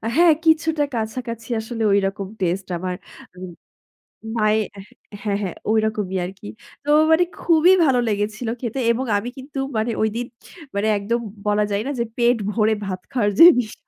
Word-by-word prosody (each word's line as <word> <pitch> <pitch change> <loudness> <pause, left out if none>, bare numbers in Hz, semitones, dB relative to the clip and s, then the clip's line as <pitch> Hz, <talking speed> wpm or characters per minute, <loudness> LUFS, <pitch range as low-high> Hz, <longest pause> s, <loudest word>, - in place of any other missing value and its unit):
হ্যাঁ, 340 -1 +6
কিছুটা 320 -1 +3
কাছাকাছি 230 +1 -5
আসলে 225 +1 -6
ঐরকম 195 0 0
টেস্টে 185 +1 -2
আমার 180 0 -3 0.4
উম 185 -1 -8 0.9
মায়ের 215 0 +1 0.5
হ্যাঁ, 200 -2 0
হ্যাঁ, 185 -4 -4
ঐরকমই 215 -3 0
আরকি। 185 - -9 0.4
তো 290 - -6 0.2
মানে 320 +2 +5 0.2
খুবই 335 +1 +4
ভালো 260 -4 +3
লেগেছিল 215 +2 -2
খেতে 245 +1 -3
এবং 250 +3 -1
আমি 230 +4 -4
কিন্তু 275 +2 -10 0.2
মানে 220 +2 0
ঐদিন 220 +3 -1 0.5
মানে 205 +2 0
একদম 220 +4 -1 0.3
বলা 210 0 +2
যায় 200 +1 0
না - - -1
যে, - - +2
পেট 240 0 +3
ভরে 220 0 +2
ভাত 185 -1 -4
খাওয়ার 215 -6 +1
যে, - - +11 0.2
বিষয়। 215 -3 -10
220 Hz, 155 wpm, -21 LUFS, 200-245 Hz, 0.9 s, যে